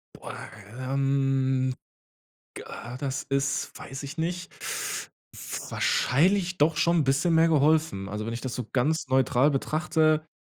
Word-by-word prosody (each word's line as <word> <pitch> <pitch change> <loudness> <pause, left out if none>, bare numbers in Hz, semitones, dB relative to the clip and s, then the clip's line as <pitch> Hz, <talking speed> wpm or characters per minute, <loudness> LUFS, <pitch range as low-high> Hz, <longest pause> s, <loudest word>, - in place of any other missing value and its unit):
Boah, - - -8 0.4
ähm, 135 -1 +1 0.8
g - - -7
ah, 120 +2 -7
das 135 -1 -2
ist, 140 0 -1
weiß 135 +2 -7
ich 140 +4 -8
nicht, 175 +2 -3
f - - -3 0.8
wahrscheinlich 180 +6 +2
doch 150 +2 +3
schon 170 +3 +3
'n 150 - +3
bisschen 145 +6 +2
mehr 165 +1 +5
geholfen. 150 -9 +2
Also, 105 +2 -4
wenn 115 - -3
ich 120 - -6
das 130 -2 -4
so 125 -4 -4
ganz 145 +5 +1
neutral 130 +1 +3
betrachte 155 +2 +1
140 Hz, 145 wpm, -27 LUFS, 130-160 Hz, 0.8 s, mehr